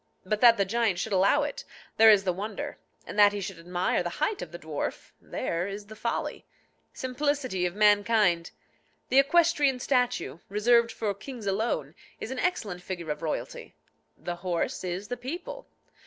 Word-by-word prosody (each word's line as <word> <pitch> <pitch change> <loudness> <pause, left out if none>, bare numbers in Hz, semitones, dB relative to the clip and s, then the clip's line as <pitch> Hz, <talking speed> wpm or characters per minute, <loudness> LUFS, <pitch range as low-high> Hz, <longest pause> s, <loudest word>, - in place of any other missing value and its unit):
But 210 +3 -1
that 235 -2 +8
the 200 - +2
giant 220 -2 +1
should 205 +4 -2
allow 190 +1 +4
it, - - -4 0.3
there 225 0 +8
is 205 -3 +6
the 185 -2 0
wonder; 205 +3 -5 0.3
and 210 - -5
that 205 0 +7
he 205 - -3
should 190 -3 -6
admire 175 +2 0
the 175 - -2
height 350 +8 0
of - - -7
the 170 - -7
dwarf, 155 -3 -5
there 170 +2 -3
is 200 +1 -6
the 215 +1 -11
folly. 235 +2 -3 0.5
Simplicity 260 -7 -1
of 175 - -7
mankind! 205 -4 +3 0.6
The 265 - +5
equestrian 290 -2 +3
statue, 250 - 0
reserved 230 +3 +3
for 215 -2 -2
kings 235 +2 -9
alone, 195 -8 -1 0.3
is 225 - -6
an 265 - -4
excellent 220 - -1
figure 175 -4 -5
of 150 +1 -5
royalty: 160 -2 -5 0.4
the 175 0 -5
horse 175 0 -2
is 185 +3 -4
the 245 - -4
people. 350 - -7
210 Hz, 170 wpm, -28 LUFS, 180-250 Hz, 0.6 s, that